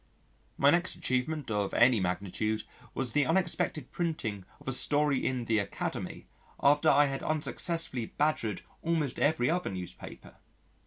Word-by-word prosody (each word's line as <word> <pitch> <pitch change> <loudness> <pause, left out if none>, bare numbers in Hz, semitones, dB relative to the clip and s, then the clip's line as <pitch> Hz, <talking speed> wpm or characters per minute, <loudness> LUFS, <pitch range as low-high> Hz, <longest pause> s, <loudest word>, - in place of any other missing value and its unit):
My 140 +1 +5
next 175 +2 +1
achievement 130 +1 -2
of 105 -2 -1
any 120 -1 +5
magnitude 100 +4 -1 0.3
was 130 -3 -1
the 145 +1 +2
unexpected 165 -6 0
printing 120 - -3
of - - -18
a - - +1
story 145 +1 +3
in 125 -2 -1
the 110 -1 +2
Academy 100 -1 -4 0.3
after 145 +1 +4
I 145 +1 +6
had 135 -1 -3
unsuccessfully 155 -4 -1
badgered 130 -10 -1 0.2
almost 160 -6 -1
every 145 -4 +2
other 180 +1 -1
newspaper. 90 -2 -8
135 Hz, 140 wpm, -30 LUFS, 110-155 Hz, 0.3 s, I